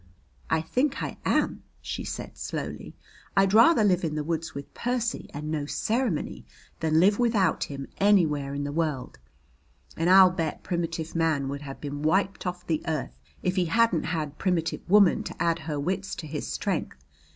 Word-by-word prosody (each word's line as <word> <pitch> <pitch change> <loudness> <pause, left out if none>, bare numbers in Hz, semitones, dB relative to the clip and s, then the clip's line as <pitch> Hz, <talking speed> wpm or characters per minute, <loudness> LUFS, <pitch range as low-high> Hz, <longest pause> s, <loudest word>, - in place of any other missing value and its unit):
"I 160 0 +2
think 260 - 0
I - - -5
am," - - +1 0.2
she - - -5
said - - -6
slowly. - - -5 0.4
"I'd 195 0 +4
rather 230 +3 +6
live 185 -3 +3
in 155 -2 -1
the 150 - -1
woods 165 +1 -3
with 140 0 -8
Percy 240 -1 -2
and 150 +1 -5
no 150 -2 -2
ceremony 225 - -1 0.4
than 160 0 +2
live 200 +5 +4
without 215 -8 +2
him 140 -1 -6
anywhere 155 -9 +3
in 145 - -2
the 145 - -3
world. 150 - -2 0.8
And 165 +2 +1
I'll 190 -1 +8
bet 165 -4 -3
primitive 165 -2 -3
man 160 -5 +1
would 140 +1 -4
have 135 -2 -8
been 145 0 -5
wiped 190 +5 +1
off 180 0 -4
the 160 -2 0
earth 155 -4 -2 0.3
if 185 +1 0
he 180 - +3
hadn't 210 -2 +2
had 155 -3 -3
primitive 170 -4 0
woman 200 -2 +6
to - - -8
add 165 0 +1
her 155 -2 -4
wits 190 +6 -2
to 160 - -7
his 150 -1 -4
strength. - - -2
165 Hz, 175 wpm, -27 LUFS, 150-195 Hz, 0.8 s, I'll